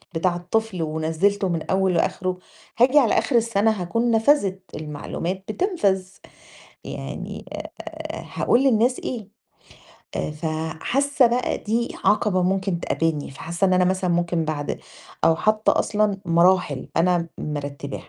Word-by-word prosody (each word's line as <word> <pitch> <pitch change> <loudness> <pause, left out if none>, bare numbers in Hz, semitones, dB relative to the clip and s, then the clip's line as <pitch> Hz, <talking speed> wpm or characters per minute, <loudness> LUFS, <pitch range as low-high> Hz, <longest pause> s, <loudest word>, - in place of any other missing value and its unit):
بتاع 175 +1 +1
الطفل 185 +1 -2
ونزِّلته 165 +6 0
من 165 -2 -1
أوّله 190 -2 +2
لآخره 185 +2 0 0.4
هاجي 260 +5 +6
على 240 - +3
آخر 255 - -1
السنة 225 -2 +3
هاكون 230 +5 0
نفذت، 220 -5 +3
المعلومات 155 +5 -4
بتنفذ، 205 - 0 0.8
يعني - - -6
أ - - -5 0.2
أ - - -7
هاقول 255 +3 +3
للناس 250 0 +3
إيه؟ 220 -6 -5 0.9
آآ - - -2
ف 150 +2 -5 0.4
حاسة 275 -1 +3
بقى 245 +2 0
دي 230 +3 -2
عقبة 205 -3 +3
ممكن 190 -1 0
تقابلني، 160 -4 -1
فحاسة 170 +7 -3
إن 185 - +2
أنا 180 0 +4
مثلًا 185 -1 +1
ممكن 170 -1 +1
بعد 150 -2 -3 0.4
أو 165 - +5
حتى 215 0 +2
أصلًا 210 -2 +1
مراحل 170 -4 +3
أنا 170 0 +2
مرتباها. 145 -2 -5
190 Hz, 135 wpm, -23 LUFS, 170-220 Hz, 0.9 s, هاجي